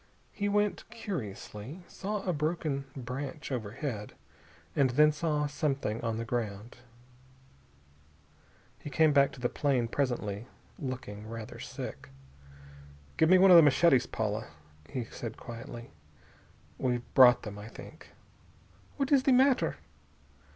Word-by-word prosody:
He 205 Hz, -1 st, -2 dB
went 205 Hz, +1 st, 0 dB
curiously, 145 Hz, -, -6 dB
saw 205 Hz, 0 st, -4 dB
a 180 Hz, -, 0 dB
broken 150 Hz, -2 st, -1 dB
branch 135 Hz, +3 st, -5 dB
overhead, 115 Hz, -1 st, -4 dB, 0.6 s
and 135 Hz, -2 st, +4 dB
then 150 Hz, +5 st, +5 dB
saw 150 Hz, -1 st, 0 dB
something 140 Hz, -6 st, -1 dB
on 115 Hz, -1 st, -2 dB
the 115 Hz, -, -3 dB
ground. 115 Hz, -1 st, -4 dB, 2.0 s
He -, -, -7 dB
came 155 Hz, +1 st, +4 dB
back 140 Hz, -1 st, +5 dB
to -, -, -11 dB
the 125 Hz, -, +1 dB
plane 130 Hz, -3 st, 0 dB
presently, 115 Hz, -4 st, -2 dB, 0.3 s
looking 120 Hz, -6 st, -6 dB
rather 115 Hz, -1 st, -7 dB
sick. -, -, -7 dB, 1.1 s
"Give 160 Hz, -, +4 dB
me 185 Hz, -, +8 dB
one 190 Hz, 0 st, +7 dB
of 175 Hz, -, +11 dB
the -, -, +10 dB
machetes, 145 Hz, -3 st, +4 dB
Paula," 110 Hz, 0 st, -2 dB, 0.4 s
he 125 Hz, -, -3 dB
said 115 Hz, -1 st, -7 dB
quietly. 120 Hz, 0 st, -9 dB, 0.9 s
"We 125 Hz, -2 st, 0 dB
brought 125 Hz, -2 st, +7 dB
them, 105 Hz, -2 st, -7 dB
I 105 Hz, -, -8 dB
think." 115 Hz, -, -12 dB, 0.9 s
"What 275 Hz, -1 st, -1 dB
is 275 Hz, -2 st, +6 dB
the 265 Hz, -, +3 dB
matter?" 255 Hz, -, +3 dB
135 Hz, 130 wpm, -30 LUFS, 115-160 Hz, 2.0 s, of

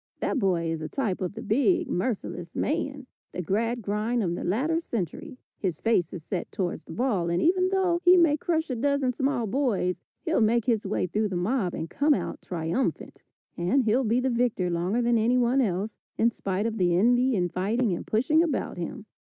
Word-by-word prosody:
That 280 Hz, -, 0 dB
boy 175 Hz, -6 st, +1 dB
is 165 Hz, -1 st, -3 dB
a 155 Hz, -, -4 dB
type 215 Hz, -10 st, -2 dB
of 185 Hz, +1 st, -2 dB
the 225 Hz, -, -6 dB
big, 285 Hz, -, +2 dB
merciless 180 Hz, -4 st, -3 dB
man, 280 Hz, -2 st, -2 dB, 0.3 s
the 180 Hz, -, -3 dB
Gradgrind 225 Hz, +3 st, -1 dB
of 170 Hz, -2 st, -1 dB
the -, -, -4 dB
latter 285 Hz, -, +1 dB
century. 230 Hz, -, -5 dB, 0.2 s
His 180 Hz, -5 st, -2 dB
face 205 Hz, -7 st, +1 dB
is 175 Hz, -4 st, -7 dB
set 180 Hz, +2 st, -4 dB
towards 180 Hz, -3 st, -3 dB
the -, -, -11 dB
ball, 215 Hz, -9 st, 0 dB
and 170 Hz, +1 st, +1 dB
even 370 Hz, +2 st, +3 dB
though 375 Hz, -3 st, +1 dB
he 360 Hz, 0 st, +7 dB
may 330 Hz, -4 st, +5 dB
crush 320 Hz, -1 st, -1 dB
a -, -, -1 dB
dozen 280 Hz, +1 st, +1 dB
small 265 Hz, -1 st, 0 dB
boys, 210 Hz, -6 st, 0 dB, 0.2 s
he'll 330 Hz, -7 st, +1 dB
make 225 Hz, +1 st, +3 dB
his 225 Hz, -5 st, +1 dB
way 190 Hz, -, 0 dB
through 210 Hz, +4 st, 0 dB
the 190 Hz, -, -4 dB
mob 185 Hz, +1 st, 0 dB
and 160 Hz, -, -4 dB
come 290 Hz, -, +2 dB
out -, -, -4 dB
triumphant. 170 Hz, +8 st, -3 dB, 0.3 s
And 185 Hz, +11 st, +1 dB
he'll 235 Hz, +4 st, +2 dB
be 230 Hz, +1 st, +2 dB
the 260 Hz, 0 st, 0 dB
victor 235 Hz, -7 st, 0 dB
longer 180 Hz, +8 st, 0 dB
than 235 Hz, -1 st, +3 dB
anyone 245 Hz, +3 st, +3 dB
else, 205 Hz, -1 st, -1 dB, 0.2 s
in 230 Hz, +1 st, +3 dB
spite 195 Hz, -1 st, -2 dB
of 225 Hz, -1 st, -2 dB
the 175 Hz, -2 st, +3 dB
envy 245 Hz, +6 st, +3 dB
and 175 Hz, -3 st, -1 dB
fighting 210 Hz, +3 st, 0 dB
and 170 Hz, -, -5 dB
pushing 265 Hz, +9 st, +3 dB
about 335 Hz, -3 st, -1 dB
him. -, -, -5 dB
225 Hz, 200 wpm, -26 LUFS, 185-265 Hz, 0.3 s, he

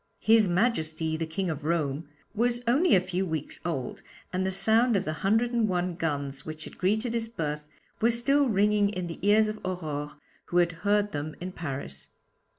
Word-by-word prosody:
'His 220 Hz, -1 st, +4 dB
Majesty 160 Hz, -5 st, 0 dB
the 160 Hz, 0 st, -3 dB
King 175 Hz, +2 st, -2 dB
of 150 Hz, -1 st, -6 dB
Rome' 155 Hz, -2 st, -1 dB, 0.3 s
was 240 Hz, +2 st, +1 dB
only 290 Hz, -, +4 dB
a -, -, +6 dB
few 185 Hz, +1 st, -2 dB
weeks 160 Hz, -5 st, -3 dB
old, 155 Hz, -7 st, -3 dB, 0.3 s
and 185 Hz, +1 st, 0 dB
the 190 Hz, -, 0 dB
sound 225 Hz, +5 st, +3 dB
of 195 Hz, 0 st, +1 dB
the 155 Hz, -, -2 dB
hundred 225 Hz, +5 st, +2 dB
and 230 Hz, -3 st, +2 dB
one 180 Hz, -1 st, 0 dB
guns 145 Hz, -5 st, -3 dB
which 155 Hz, 0 st, -7 dB
had -, -, -11 dB
greeted 215 Hz, +5 st, +1 dB
his 230 Hz, -1 st, -2 dB
birth 150 Hz, -8 st, -4 dB, 0.3 s
were 230 Hz, -, +5 dB
still 265 Hz, +4 st, +3 dB
ringing 205 Hz, 0 st, +3 dB
in 185 Hz, -3 st, -3 dB
the 170 Hz, -1 st, -7 dB
ears 210 Hz, +3 st, +4 dB
of 215 Hz, 0 st, -4 dB
Aurore, 155 Hz, -6 st, -3 dB, 0.4 s
who 175 Hz, -, -1 dB
had 175 Hz, -1 st, +4 dB
heard 205 Hz, +1 st, +2 dB
them 150 Hz, 0 st, -4 dB
in 180 Hz, +1 st, -5 dB
Paris. 140 Hz, -, -5 dB
185 Hz, 190 wpm, -28 LUFS, 160-220 Hz, 0.4 s, a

